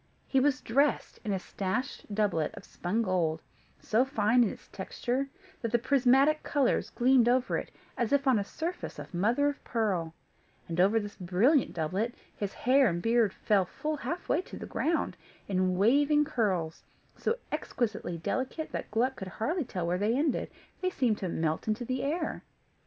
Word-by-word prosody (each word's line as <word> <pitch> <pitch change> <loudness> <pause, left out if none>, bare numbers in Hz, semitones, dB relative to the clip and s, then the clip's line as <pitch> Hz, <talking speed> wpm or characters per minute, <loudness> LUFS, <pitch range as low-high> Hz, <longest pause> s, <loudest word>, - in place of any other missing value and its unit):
He 270 - +3
was 265 -1 +2
dressed 280 +5 +1
in 215 - -2
a 195 - +1
slashed 210 +7 -4
doublet 200 -8 +1
of - - -9
spun 210 +7 -1
gold, 170 -5 0 0.4
so 225 +4 +2
fine 240 -2 +3
in 220 - +1
its - - -10
texture, 250 +7 -3 0.3
that 230 - -2
the 240 - +4
prismatic 270 +4 +4
colours 280 -4 +1
gleamed 245 -1 +4
over 255 +1 +2
it, - - -3 0.3
as 235 -2 -1
if 280 0 +3
on 260 -5 +4
a - - 0
surface 335 - -5
of - - -9
mother 230 +11 +2
of 290 0 -3
pearl; 185 -9 -1 0.5
and, 170 +1 -3
over 205 +4 +4
this 205 -1 -7
brilliant 210 - +2
doublet, 185 +9 -1 0.2
his 205 -2 -3
hair 265 +2 +4
and 170 0 -3
beard 230 -3 +3
fell 200 -2 +2
full 305 - -3
halfway 335 +1 -1
to - - -10
the - - -6
ground, 330 +1 -1 0.3
in 185 -1 +1
waving 290 +8 +4
curls, 190 - -1 0.3
so 465 - -1
exquisitely 210 -7 -2
delicate 260 - -3
that - - -4
Gluck 250 +5 +1
could 190 - -6
hardly 290 - -2
tell 185 -7 -3
where 175 +2 0
they 220 +5 +2
ended; 290 -2 0 0.3
they 370 - +1
seemed 245 - +1
to 185 - -2
melt 160 +2 -1
into 220 +3 -1 0.2
air. 315 +3 -2
230 Hz, 175 wpm, -30 LUFS, 190-275 Hz, 0.5 s, the